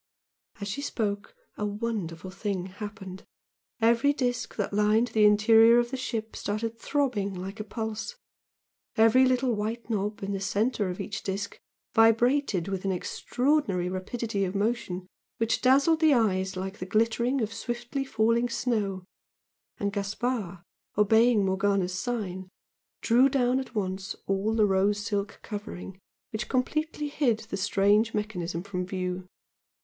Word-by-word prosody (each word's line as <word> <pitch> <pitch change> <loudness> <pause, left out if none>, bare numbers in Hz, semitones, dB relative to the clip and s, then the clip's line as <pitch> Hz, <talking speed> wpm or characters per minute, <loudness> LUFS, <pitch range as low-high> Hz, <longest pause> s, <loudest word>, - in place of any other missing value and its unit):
As 200 - -4
she 210 +8 -3
spoke, 210 - -3 0.2
a - - -3
wonderful 200 -5 -4
thing 195 -2 -3
happened 195 -1 -8 0.6
every 235 +5 +4
disc 245 -4 -2
that 205 -1 -2
lined 210 +3 +3
the 220 -1 +4
interior 225 +2 +6
of 240 0 +1
the - - -2
ship 225 -4 -4
started 225 +2 -3
throbbing 230 -9 0
like 190 +4 -6
a - - -2
pulse, 220 - -4 0.8
every 225 +3 +6
little 255 -1 +2
white 225 +3 -3
knob 210 -1 -2
in 195 - -2
the 195 - -2
centre 205 +1 0
of 180 - -5
each 200 -1 -4
disc 200 +1 -4 0.3
vibrated 225 - +3
with 195 -1 -3
an 195 - 0
extraordinary 200 - 0
rapidity 200 +3 -2
of 190 +1 -2
motion 200 -4 -1 0.3
which 225 0 0
dazzled 275 +5 +4
the 315 -3 +5
eyes 190 -5 +1
like 190 +1 -5
the 185 - -5
glittering 230 +5 +1
of 220 -2 -2
swiftly 240 +3 -3
falling 230 -1 +1
snow, 210 -6 -1 0.7
and 200 0 -2
Gaspard, 200 -2 -2 0.3
obeying 220 +1 +4
Morgana's 190 -1 +1
sign, 190 -3 -3 0.5
drew 250 +4 +5
down 255 -1 +2
at 260 -2 -7
once 190 0 -2
all 195 +3 0
the 215 -2 +4
rose 200 +1 +1
silk 205 -2 -2
covering 200 -3 -7 0.3
which 220 - -4
completely 300 +4 -1
hid 265 -7 +1
the - - -1
strange 205 +3 +2
mechanism 180 -5 -3
from 185 -2 -3
view. 185 0 -4
210 Hz, 145 wpm, -28 LUFS, 195-235 Hz, 0.8 s, interior